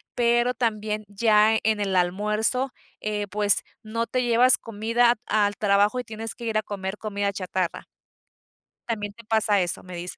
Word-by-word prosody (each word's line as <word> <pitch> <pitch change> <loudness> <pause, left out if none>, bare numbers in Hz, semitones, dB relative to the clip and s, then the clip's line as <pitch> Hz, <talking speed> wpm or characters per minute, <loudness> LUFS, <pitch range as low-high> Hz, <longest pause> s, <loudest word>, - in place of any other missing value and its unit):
pero 240 +1 +2
también 215 -3 -2
ya, 215 +1 +3
en 220 -1 +1
el 195 -2 -1
almuerzo, 210 +8 0 0.3
eh, 210 -1 -2
pues, 205 0 +2 0.2
no 230 +2 -2
te 255 -1 -1
llevas 240 +1 +5
comida 230 +2 +1
al 205 -1 +1
trabajo 205 +3 +2
y - - -3
tienes 225 -1 -6
que 235 - -8
ir 220 -1 0
a 215 - +2
comer 195 -1 -5
comida 205 -2 -2
chatarra. 185 -2 -3 1.0
También 205 -3 -3
te 230 +2 -15
pasa 215 -2 +2
eso, 175 - -2
me 185 -1 -9
dices. 175 +1 -6
215 Hz, 165 wpm, -25 LUFS, 205-230 Hz, 1.0 s, llevas